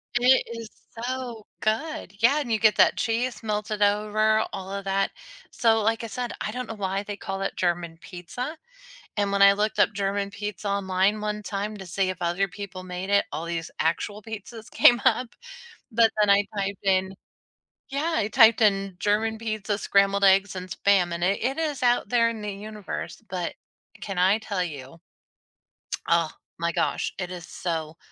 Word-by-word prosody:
It 250 Hz, +2 st, +5 dB
is 225 Hz, -2 st, -7 dB, 0.4 s
so 250 Hz, -4 st, -4 dB, 0.2 s
good. 225 Hz, -, -2 dB
Yeah 280 Hz, +6 st, +5 dB
and 240 Hz, -6 st, -3 dB
you 220 Hz, -, +2 dB
get 215 Hz, -3 st, +5 dB
that -, -, +5 dB
cheese 240 Hz, +1 st, -1 dB
melted 210 Hz, 0 st, -2 dB
over, 215 Hz, +1 st, +3 dB
all 190 Hz, 0 st, -6 dB
of 200 Hz, 0 st, -4 dB
that. 195 Hz, 0 st, +1 dB, 0.4 s
So, 225 Hz, -1 st, +3 dB
like 225 Hz, +2 st, +1 dB
I -, -, -3 dB
said, 245 Hz, +2 st, -4 dB
I 210 Hz, -, -2 dB
don't 250 Hz, +1 st, -5 dB
know 225 Hz, -, -5 dB
why 195 Hz, -1 st, -2 dB
they 205 Hz, 0 st, -6 dB
call 195 Hz, 0 st, -5 dB
it 195 Hz, -, -2 dB
German 170 Hz, -2 st, -1 dB
pizza. 200 Hz, -, -7 dB, 0.6 s
And 205 Hz, -1 st, +1 dB
when 200 Hz, 0 st, +3 dB
I 200 Hz, -, +9 dB
looked 210 Hz, +1 st, -1 dB
up 205 Hz, -, +4 dB
German 200 Hz, 0 st, -1 dB
pizza 210 Hz, 0 st, -5 dB
online 200 Hz, +1 st, +1 dB
one 210 Hz, 0 st, -3 dB
time 205 Hz, +1 st, -3 dB
to 190 Hz, -, -8 dB
see 185 Hz, +1 st, 0 dB
if 185 Hz, -, -6 dB
other 175 Hz, +3 st, 0 dB
people 190 Hz, -1 st, -8 dB
made 180 Hz, +1 st, -6 dB
it, 200 Hz, 0 st, +4 dB
all 165 Hz, -, -3 dB
these 165 Hz, -1 st, -4 dB
actual 205 Hz, +6 st, -1 dB
pizzas 220 Hz, +2 st, -9 dB
came 240 Hz, -1 st, +6 dB
up. 250 Hz, -1 st, +3 dB, 0.6 s
But 225 Hz, 0 st, +5 dB
then 210 Hz, -, +4 dB
I 200 Hz, 0 st, +5 dB
typed 200 Hz, 0 st, -3 dB
in 190 Hz, 0 st, +2 dB, 0.7 s
yeah 295 Hz, +5 st, -1 dB
I 205 Hz, -, +1 dB
typed 230 Hz, -1 st, +6 dB
in 195 Hz, -3 st, +2 dB
"German 220 Hz, +2 st, +1 dB
pizza, 215 Hz, -2 st, -2 dB
scrambled 200 Hz, 0 st, +3 dB
eggs, 195 Hz, 0 st, +5 dB
and 185 Hz, 0 st, -6 dB
spam." 185 Hz, -2 st, +2 dB
And 170 Hz, -, -5 dB
it 195 Hz, +2 st, +1 dB
it 265 Hz, +5 st, 0 dB
is 300 Hz, -5 st, -2 dB
out 245 Hz, 0 st, +3 dB
there 235 Hz, -1 st, +3 dB
in 225 Hz, -2 st, -6 dB
the 210 Hz, -1 st, -3 dB
universe 210 Hz, +2 st, -7 dB
but 180 Hz, -2 st, -3 dB, 0.5 s
can 195 Hz, -2 st, -5 dB
I 190 Hz, +4 st, +4 dB
tell 200 Hz, -4 st, -2 dB
you? 145 Hz, -2 st, -7 dB, 1.1 s
Oh 170 Hz, -2 st, +3 dB, 0.3 s
my 170 Hz, 0 st, 0 dB
gosh, -, -, 0 dB
it 180 Hz, -1 st, -4 dB
is 175 Hz, -2 st, -7 dB
so, 160 Hz, -2 st, -4 dB
205 Hz, 185 wpm, -26 LUFS, 190-220 Hz, 1.1 s, I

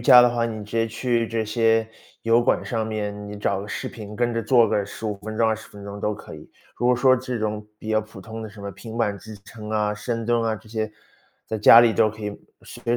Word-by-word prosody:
伽 125 Hz, +1 st, +9 dB
的 120 Hz, -, +5 dB
话， 120 Hz, -1 st, 0 dB
你 110 Hz, -2 st, -5 dB
直 105 Hz, -, -15 dB
接 115 Hz, 0 st, +2 dB
去 115 Hz, +1 st, 0 dB
这 115 Hz, -1 st, -1 dB
些 115 Hz, 0 st, +2 dB, 0.4 s
油 115 Hz, +1 st, +4 dB
管 -, -, +2 dB
上 110 Hz, -2 st, -2 dB
面， 105 Hz, -1 st, -4 dB
你 105 Hz, -, -7 dB
找 100 Hz, -1 st, 0 dB
个 105 Hz, -, -8 dB
视 -, -, -4 dB
频， 105 Hz, -2 st, -9 dB
跟 120 Hz, 0 st, +1 dB
着 115 Hz, 0 st, -1 dB
做 120 Hz, +1 st, +5 dB
个 100 Hz, -, +1 dB
15 105 Hz, +1 st, -5 dB
分 110 Hz, +1 st, -7 dB
钟、 115 Hz, -, +3 dB
20 110 Hz, 0 st, -3 dB
分 100 Hz, -1 st, -12 dB
钟 100 Hz, 0 st, -7 dB
都 105 Hz, 0 st, 0 dB
可 -, -, -11 dB
以。 -, -, -12 dB, 0.3 s
如 120 Hz, -, +1 dB
果 125 Hz, -1 st, +4 dB
说 130 Hz, +1 st, +5 dB
这 125 Hz, -1 st, -4 dB
种 105 Hz, -1 st, -3 dB
比 110 Hz, -, -6 dB
较 110 Hz, -, +3 dB
普 105 Hz, -3 st, -12 dB
通 110 Hz, +3 st, -7 dB
的 110 Hz, -, -6 dB
什 105 Hz, 0 st, -13 dB
么 100 Hz, 0 st, -5 dB
平 115 Hz, +4 st, -9 dB
板 105 Hz, -4 st, 0 dB
支 110 Hz, +3 st, -10 dB
撑 105 Hz, -1 st, -10 dB
啊， 105 Hz, -1 st, +1 dB
深 115 Hz, +2 st, -3 dB
蹲 120 Hz, 0 st, +2 dB
啊， 110 Hz, -1 st, 0 dB
这 110 Hz, +1 st, -13 dB
些， 110 Hz, -1 st, -2 dB, 0.6 s
在 110 Hz, -, -3 dB
家 115 Hz, +2 st, +9 dB
里 115 Hz, -2 st, +5 dB
都 110 Hz, -, +4 dB
可 110 Hz, 0 st, -9 dB
以 105 Hz, -, -2 dB, 0.3 s
随 120 Hz, +1 st, -2 dB
110 Hz, 270 characters per minute, -24 LUFS, 105-115 Hz, 0.6 s, 伽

